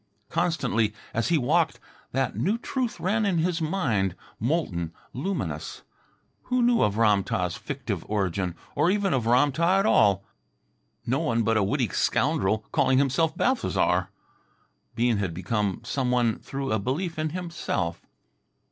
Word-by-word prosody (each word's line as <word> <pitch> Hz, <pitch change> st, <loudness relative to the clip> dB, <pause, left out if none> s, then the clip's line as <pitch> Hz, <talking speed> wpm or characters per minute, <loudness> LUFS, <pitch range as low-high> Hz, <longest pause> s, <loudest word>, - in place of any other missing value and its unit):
Constantly 135 Hz, -11 st, +1 dB, 0.2 s
as 115 Hz, -, 0 dB
he 170 Hz, -, +3 dB
walked 155 Hz, +5 st, +1 dB, 0.3 s
that 130 Hz, -1 st, -1 dB
new 210 Hz, +5 st, +1 dB
truth 245 Hz, 0 st, -3 dB
ran 210 Hz, +5 st, +1 dB
in 195 Hz, -4 st, +1 dB
his 165 Hz, +1 st, 0 dB
mind, 120 Hz, -, 0 dB, 0.2 s
molten, 105 Hz, -, -1 dB, 0.2 s
luminous. 185 Hz, +10 st, -4 dB, 0.6 s
Who 250 Hz, -1 st, +1 dB
knew 240 Hz, -1 st, +4 dB
of 105 Hz, 0 st, +2 dB
Ram 105 Hz, -3 st, +4 dB
tah's 90 Hz, -2 st, -1 dB
fictive 120 Hz, -, -4 dB
origin, 95 Hz, -4 st, -1 dB, 0.2 s
or 150 Hz, +3 st, +2 dB
even 200 Hz, 0 st, +1 dB
of 120 Hz, -4 st, 0 dB
Ram 130 Hz, +5 st, +4 dB
tah 170 Hz, +6 st, +2 dB
at 195 Hz, -, +2 dB
all? 100 Hz, -, +4 dB, 0.8 s
No -, -, +1 dB
one 115 Hz, 0 st, +1 dB
but 115 Hz, +1 st, +2 dB
a 110 Hz, -, +3 dB
witty 125 Hz, +3 st, 0 dB
scoundrel 125 Hz, -5 st, +1 dB
calling 130 Hz, -4 st, +3 dB
himself 140 Hz, +4 st, +2 dB
Balthasar. 95 Hz, -, +1 dB, 0.9 s
Bean 120 Hz, -1 st, +2 dB
had 95 Hz, -5 st, -2 dB
become 100 Hz, +2 st, -1 dB
some 130 Hz, -3 st, -1 dB
one 120 Hz, -3 st, +2 dB
through 135 Hz, 0 st, -4 dB
a 110 Hz, -, +2 dB
belief 155 Hz, -, -2 dB
in 155 Hz, 0 st, 0 dB
himself. 170 Hz, -, -3 dB
130 Hz, 145 wpm, -26 LUFS, 105-170 Hz, 0.9 s, knew